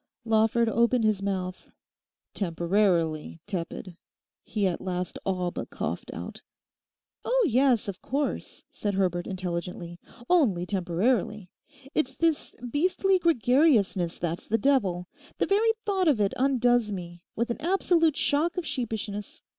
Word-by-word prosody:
Lawford 225 +1 +3
opened 235 +1 +2
his 215 -2 +2
mouth; 185 -2 -3 0.6
'Temporarily 170 -3 0
tepid,' 180 -2 -5 0.5
he 210 -2 -1
at 180 -2 -1
last 180 -1 -3
all 180 -2 -1
but - - -6
coughed - - -4
out. - - -7 0.8
'Oh - - +2
yes, 255 -3 +3
of 195 -2 -5
course,' 280 +2 -3
said 205 -2 -2
Herbert 180 -2 0
intelligently. 175 -2 -4 0.3
'Only 240 - +3
temporarily. 190 +2 0 0.4
It's 265 -3 0
this 330 -3 0
beastly 370 +7 +2
gregariousness 245 - +3
that's 170 0 -3
the 225 - +2
devil. 200 -9 +1 0.3
The - - +2
very 425 +3 +3 0.2
thought 385 -4 +1
of 280 -8 +3
it 200 -1 +1
undoes 245 -4 +2
me—with 180 +6 -5
an - - -3
absolute 335 -3 +2
shock 320 +5 +2
of 360 - -2
sheepishness. 220 -4 -4
215 Hz, 125 wpm, -27 LUFS, 180-275 Hz, 0.8 s, Lawford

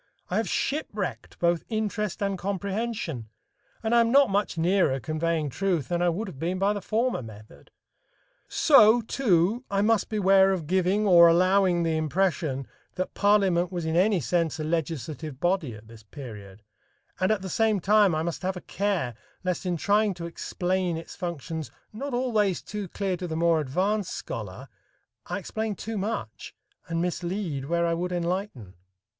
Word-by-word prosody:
I - - +1
have - - 0
shipwrecked 215 - -3
both 170 -1 +1
interest 215 -2 -2
and 200 -1 0
comprehension, 195 - -3 0.5
and 220 +1 0
I 235 - +6
am 230 0 +2
not 275 -4 +5
much 200 -3 0
nearer 170 -5 +2
conveying 155 +2 -1
truth 175 -6 -1
than 175 0 0
I 175 - +3
would 200 +6 -2
have 150 -8 -9
been 175 +4 -1
by 200 +2 +2
the 205 - -4
former 230 - 0
method. 110 -2 -13 0.8
So, 240 -6 +6
too, 220 -2 +1
I 200 0 +1
must 225 0 +2
beware 195 -2 +4
of 175 -5 -3
giving 190 +5 +1
or 170 -3 +8
allowing 180 +1 +3
the 165 -1 0
impression 155 -3 0 0.3
that 185 0 -3
parliament 195 -4 +3
was 175 -3 -3
in 160 0 -1
any 190 +2 +3
sense 165 -1 0
a - - -2
legislative 155 -2 -3
body 175 - 0
at 110 +1 -14
this 115 -1 -13
period, 105 -4 -10 0.6
and 185 - +2
at 210 -3 0
the - - -4
same 215 +2 +2
time 205 -2 +4
I 155 - 0
must 170 -1 -3
have 185 0 -2
a - - -7
care 190 -11 -1 0.3
lest 185 0 -2
in 175 -1 0
trying 205 +3 +2
to 170 -1 -6
explain 180 +1 -2
its 165 - -9
functions 165 -3 -5 0.2
not 275 +6 -5
always 220 -7 +1
too 205 -2 -5
clear 190 +1 -2
to 180 - -5
the 160 - -4
more 165 -1 +3
advanced 185 +8 -1
scholar, - - -6 0.6
I - - -2
explain 220 -1 -3
too 220 +2 -4
much 190 - -5 0.3
and 165 0 -1
mislead 175 -5 -3
where 170 +3 +1
I 170 - +1
would 180 +2 -2
enlighten. 175 - -3
180 Hz, 170 wpm, -26 LUFS, 165-205 Hz, 0.8 s, or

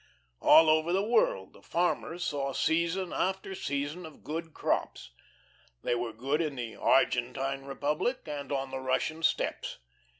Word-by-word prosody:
All 160 - +8
over 155 +2 +3
the 190 +2 +2
world - - +2
the - - -17
farmers 175 0 -1
saw 140 -3 -2
season 170 +5 0
after 190 +1 -1
season 145 0 -3
of 160 -2 -12
good 160 +2 -4
crops. 60 - -2 0.7
They - - +1
were 120 -1 -2
good 135 +8 -1
in 150 -4 -2
the 120 -3 -5
Argentine 135 +2 +1
Republic, 150 - -1
and 145 -2 -5
on 135 -1 -2
the 135 - -3
Russian 130 +5 -1
steppes. 160 - 0
150 Hz, 145 wpm, -30 LUFS, 135-170 Hz, 0.7 s, All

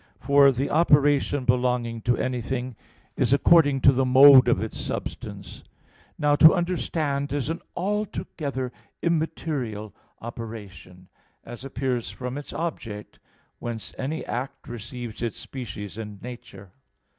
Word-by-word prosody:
For 140 0 +5
the 135 +2 -2
operation 145 -3 +3
belonging 125 -2 0
to 120 - +4
anything 125 0 -3 0.4
is - - +2
according 145 -2 +4
to 135 - +7
the 135 0 +1
mode 130 +1 +8
of - - +3
its - - -5
substance. - - -6 0.5
Now 145 0 +3
to 160 - +8
understand 160 -5 -1
is 145 +1 -1
an 165 - -5 0.2
altogether 170 - -3 0.3
immaterial 145 - -2 0.3
operation, 100 -6 -9 0.4
as 120 +1 -10
appears 130 -3 -2
from 125 +2 -5
its 145 - -9
object, 115 -11 -5 0.4
whence 115 -2 -5
any 150 +5 -4
act 130 +3 -5
receives 120 0 -7
its 115 -3 -3
species 105 -5 -7
and 105 -2 -7
nature. 120 -6 -10
130 Hz, 120 wpm, -25 LUFS, 115-145 Hz, 0.5 s, mode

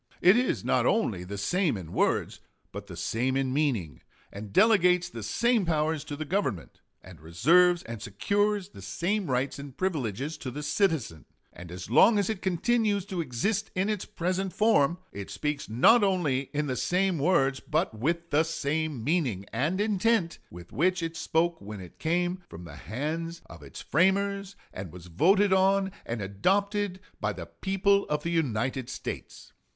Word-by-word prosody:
It 185 +3 +6
is 250 +1 0
not - - +2
only 110 - +1
the 100 +3 -6
same 150 - 0
in 85 -4 -9
words, - - 0 0.3
but 100 +1 -8
the 90 -4 -9
same 130 +4 -1
in 130 -1 0
meaning, 120 - -1 0.3
and 100 0 -8
delegates 180 - +4
the 115 - -8
same 230 - +1
powers 155 -2 0
to 145 - -5
the 155 +2 -5
Government, 145 - -2 0.2
and 85 -4 -13
reserves 170 - +4
and 115 -2 -7
secures 205 - 0
the 100 - -13
same 175 - -2
rights 130 +3 -1
and 140 -2 -10
privileges 150 - -2
to 130 - -5
the 150 +4 -6
citizen; 145 - 0 0.3
and 85 -1 -11
as 90 0 -7
long 215 +1 +5
as 205 +1 +1
it 210 - -5
continues 205 +2 +1
to 185 -3 -3
exist 185 - -1
in 190 +3 0
its 210 -3 -2
present 185 +2 -2
form, 190 -7 +3 0.2
it 100 -1 -7
speaks 140 +9 -3
not 205 - +5
only 155 -9 +1
in 150 +1 -1
the 130 -3 -2
same 180 +3 +1
words 135 -4 +2
but 155 -3 -1
with 170 +9 -2
the 150 - +4
same 155 -4 -2
meaning 130 - 0
and 150 - 0
intent 210 -3 +1
with 85 0 -12
which 180 +3 +1
it 165 0 -3
spoke 165 +1 0
when 105 +1 -8
it 90 -2 -12
came 175 +3 0
from 85 - -10
the 75 -4 -10
hands 160 - -4
of - - -13
its - - -10
framers 195 +3 +1 0.2
and 95 -3 -7
was 90 -1 -11
voted 190 - +3
on 195 +1 +3 0.2
and 115 -3 -3
adopted 195 - 0 0.2
by - - 0
the - - -7
people 200 +1 +1
of 150 0 -1
the 170 - -2
United 130 -5 -1
States. - - -7
160 Hz, 175 wpm, -28 LUFS, 115-190 Hz, 0.3 s, It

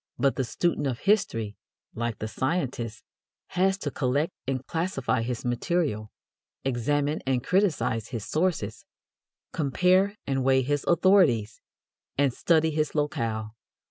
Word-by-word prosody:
But 140 -1 +2
the 130 - 0
student 150 +3 0
of 120 -3 -3
history, 115 - +1 0.4
like 115 -2 -2
the 110 - -4
scientist, 130 -4 -2 0.5
has 190 +2 +2
to 145 -7 -4
collect 145 +7 0
and 130 -1 -2
classify 165 -8 -1
his 120 +1 -3
material, 120 -3 -1 0.5
examine 145 +4 0
and 130 -2 +1
criticise 165 - +1
his 115 -5 -5
sources, 155 - -1 0.7
compare 185 +7 +3
and 135 -1 0
weigh 130 0 +4
his 145 +2 0
authorities, 170 - +4 0.6
and 140 -3 +3
study 160 +1 +2
his 155 -1 -1
locale. 115 -7 -1
135 Hz, 125 wpm, -27 LUFS, 120-165 Hz, 0.7 s, weigh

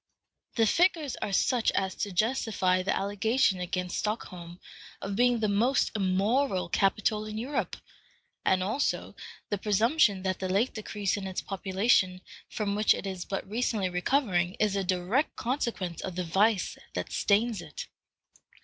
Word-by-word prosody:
The 225 - +4
figures 325 - +2
are 205 - -2
such 240 +4 +2
as 190 -1 0
to 205 - -2
justify 190 -3 +1
the 185 - 0
allegation 205 +1 +1
against 180 0 -2
Stockholm 180 -5 -4 0.4
of 195 0 -4
being 245 +1 +3
the 215 - +2
most 230 +7 +2
immoral 195 +2 +1
capital 210 +3 +1
in 215 0 -6
Europe, 260 +6 -2 0.7
and 185 -1 +2
also 220 +9 -1 0.4
the 205 - 0
presumption 210 0 +3
that 185 -1 -1
the 185 - -3
late 205 +7 +1
decrease 205 -2 -2
in 195 -1 -4
its 185 - -3
population, 190 -1 +1 0.3
from 205 -2 -2
which 210 +1 +4
it - - -6
is 190 -2 -4
but 195 -1 -4
recently 215 -3 0
recovering, 180 -2 +1
is 210 -2 +1
a 195 - 0
direct 185 - 0
consequence 235 - -2
of 185 -2 -5
the 180 - -1
vice 195 +4 +1 0.2
that - - -3
stains 215 0 +1
it. 155 -3 -7
200 Hz, 150 wpm, -29 LUFS, 185-225 Hz, 0.7 s, The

